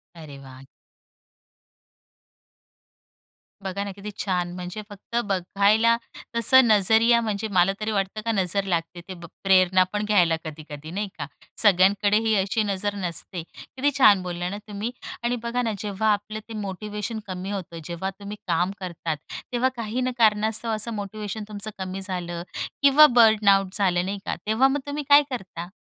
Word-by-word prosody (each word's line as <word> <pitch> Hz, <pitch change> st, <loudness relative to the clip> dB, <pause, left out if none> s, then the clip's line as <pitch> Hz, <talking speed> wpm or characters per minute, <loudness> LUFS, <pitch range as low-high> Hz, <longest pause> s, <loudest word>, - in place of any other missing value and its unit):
अरे 150 Hz, -4 st, -10 dB
वाह! 130 Hz, 0 st, -13 dB, 3.0 s
बघा 195 Hz, +1 st, -3 dB
ना, 200 Hz, -, -5 dB
किती 200 Hz, +2 st, -8 dB
छान! 180 Hz, -3 st, -1 dB
म्हणजे 180 Hz, +3 st, -6 dB
फक्त 205 Hz, +3 st, -10 dB
बघायला 200 Hz, +5 st, +3 dB, 0.4 s
तसं 250 Hz, +3 st, +5 dB
नजरिया 220 Hz, +3 st, +5 dB
म्हणजे 215 Hz, -1 st, -2 dB
मला 185 Hz, +1 st, +4 dB
तरी 215 Hz, +1 st, -2 dB
वाटतं 200 Hz, +1 st, -2 dB
का 230 Hz, -, +1 dB
नजर 195 Hz, -1 st, 0 dB
लागते, 175 Hz, -2 st, -2 dB
ते 190 Hz, -, -6 dB
ब 170 Hz, -1 st, -11 dB, 0.2 s
प्रेरणा 185 Hz, -1 st, +5 dB
पण 210 Hz, 0 st, -1 dB
घ्यायला 180 Hz, -6 st, +3 dB
कधी-कधी, 155 Hz, 0 st, -8 dB
नाही 205 Hz, +3 st, -3 dB
का? 145 Hz, -, -4 dB, 0.4 s
सगळ्यांकडे 205 Hz, +1 st, +4 dB
ही 220 Hz, -, +3 dB
अशी 205 Hz, +3 st, 0 dB
नजर 205 Hz, 0 st, -2 dB
नसते. 180 Hz, -1 st, -4 dB
किती 270 Hz, +3 st, -2 dB
छान 205 Hz, -8 st, +6 dB
बोलला 175 Hz, 0 st, -3 dB
ना 200 Hz, -, -5 dB
तुम्ही. 210 Hz, +3 st, -4 dB, 0.3 s
आणि 240 Hz, +1 st, 0 dB
बघा 240 Hz, +1 st, -1 dB
ना, 230 Hz, -2 st, -1 dB
जेव्हा 210 Hz, +1 st, 0 dB
आपलं 210 Hz, +1 st, -5 dB
ते -, -, -7 dB
मोटिवेशन 210 Hz, +3 st, -5 dB
कमी 185 Hz, +1 st, -5 dB
होतं, 170 Hz, -4 st, -6 dB
जेव्हा 175 Hz, +3 st, -4 dB
तुम्ही 205 Hz, +1 st, -7 dB
काम 175 Hz, +3 st, +1 dB
करतात 170 Hz, -4 st, -4 dB, 0.3 s
तेव्हा 250 Hz, +1 st, +2 dB
काही 235 Hz, +1 st, -3 dB
न 255 Hz, 0 st, 0 dB
कारणास्तव 220 Hz, +1 st, +2 dB
असं 220 Hz, +2 st, 0 dB
मोटिवेशन 210 Hz, +1 st, -5 dB
तुमचं 210 Hz, 0 st, -5 dB
कमी 190 Hz, 0 st, -5 dB
झालं 175 Hz, -3 st, -4 dB, 0.4 s
किंवा 285 Hz, +2 st, +8 dB
बर्न 220 Hz, -3 st, +5 dB
आउट 195 Hz, -1 st, +3 dB
झालं, 180 Hz, -3 st, +1 dB
नाही 200 Hz, +1 st, -3 dB
का, -, -, -2 dB
तेव्हा 220 Hz, +5 st, +3 dB
मग 285 Hz, +2 st, 0 dB
तुम्ही 290 Hz, +1 st, -3 dB
काय 290 Hz, +1 st, +8 dB
करता? 180 Hz, -8 st, -6 dB
200 Hz, 160 wpm, -24 LUFS, 185-220 Hz, 3.0 s, किंवा